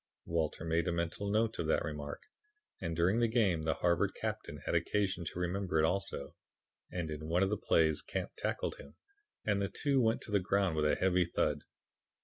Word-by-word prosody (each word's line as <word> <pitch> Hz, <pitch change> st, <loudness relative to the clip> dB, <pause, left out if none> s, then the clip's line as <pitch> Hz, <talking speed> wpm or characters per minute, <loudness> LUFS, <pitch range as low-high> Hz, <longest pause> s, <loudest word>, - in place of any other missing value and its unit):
"Walter 80 Hz, -1 st, -1 dB
made 80 Hz, +2 st, +1 dB
a -, -, +2 dB
mental 85 Hz, +4 st, -2 dB
note 110 Hz, +2 st, +1 dB
of 80 Hz, -, -1 dB
that 80 Hz, -, +2 dB
remark, 75 Hz, -2 st, -5 dB, 0.6 s
and 85 Hz, -3 st, -2 dB
during 90 Hz, +7 st, +3 dB
the 120 Hz, -, +4 dB
game 100 Hz, -9 st, +2 dB
the 80 Hz, -, +1 dB
Harvard 85 Hz, -2 st, +1 dB
captain -, -, -4 dB
had -, -, -1 dB
occasion 95 Hz, -4 st, +1 dB
to -, -, -5 dB
remember 90 Hz, 0 st, -1 dB
it 80 Hz, -, +5 dB
also, 95 Hz, -5 st, -1 dB, 0.5 s
when 85 Hz, -3 st, -3 dB
in 75 Hz, 0 st, -5 dB
one 85 Hz, +3 st, +3 dB
of 95 Hz, -, +1 dB
the -, -, +2 dB
plays 80 Hz, -6 st, +2 dB
Camp -, -, -4 dB
tackled -, -, -2 dB
him, 70 Hz, -, -13 dB, 0.5 s
and 105 Hz, -2 st, +2 dB
the 100 Hz, -, 0 dB
two 140 Hz, -3 st, +1 dB
went 115 Hz, -1 st, +2 dB
to -, -, -8 dB
the 100 Hz, -, +4 dB
ground 95 Hz, -2 st, +1 dB
with 75 Hz, -1 st, +1 dB
a 75 Hz, -, +3 dB
heavy 90 Hz, -1 st, +3 dB
thud. 85 Hz, -, 0 dB
90 Hz, 200 wpm, -33 LUFS, 80-100 Hz, 0.6 s, it